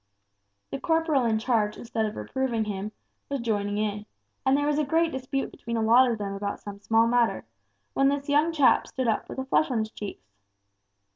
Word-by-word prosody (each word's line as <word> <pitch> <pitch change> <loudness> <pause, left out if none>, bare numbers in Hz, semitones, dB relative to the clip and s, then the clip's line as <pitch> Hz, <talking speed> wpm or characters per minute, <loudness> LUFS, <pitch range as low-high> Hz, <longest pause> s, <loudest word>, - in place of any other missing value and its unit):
The 135 - -3
corporal 320 -5 +1
in 225 -1 +2
charge 220 -2 0
instead 225 -2 -2
of 215 - -6
reproving 250 -4 -2
him, 205 0 -4 0.4
was 280 -1 -2
joining 205 -3 -1
in, 210 0 -2 0.4
and 265 +1 +3
there 290 - 0
was 295 0 +1
a - - +2
great 325 +3 +2
dispute 265 +1 -3
between 235 -1 -5
a 225 - 0
lot 245 +3 +6
of 230 - -1
them 200 -1 -4
about 200 0 -4
some 200 -1 -9
small 225 +2 +3
matter, 235 0 +1 0.5
when 275 0 +3
this 285 0 -2
young 295 +3 +3
chap 290 -5 +4
stood 260 -2 -3
up 220 - 0
with - - -7
a 265 - -3
flush 295 +3 +2
on 250 - 0
his 220 0 -2
cheeks. 200 - -8
235 Hz, 205 wpm, -26 LUFS, 215-275 Hz, 0.5 s, lot